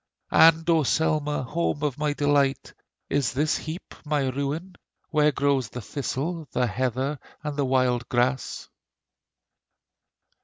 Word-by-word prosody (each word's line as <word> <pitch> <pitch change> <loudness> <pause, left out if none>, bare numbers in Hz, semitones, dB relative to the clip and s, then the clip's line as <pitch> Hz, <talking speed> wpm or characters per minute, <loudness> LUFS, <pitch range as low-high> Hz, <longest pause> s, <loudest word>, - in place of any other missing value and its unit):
And 165 0 +6
O 165 -2 +4
Selma! 150 0 +1
home 150 +1 -2
of 145 -2 -1
my 150 -1 +1
delight, 145 -2 +1 0.3
Is 140 -3 0
this 150 +4 +1
heap 160 +3 -6
my 145 -3 0
ruin, 140 +8 -3 0.4
Where 150 -1 +4
grows 140 -4 +1
the 125 - -7
thistle, 150 +6 -3
the 125 - +2
heather, 130 +5 -1 0.2
and 150 -1 -3
the 140 -1 0
wild 130 -2 +1
grass? 125 +2 0
145 Hz, 125 wpm, -25 LUFS, 130-150 Hz, 0.4 s, And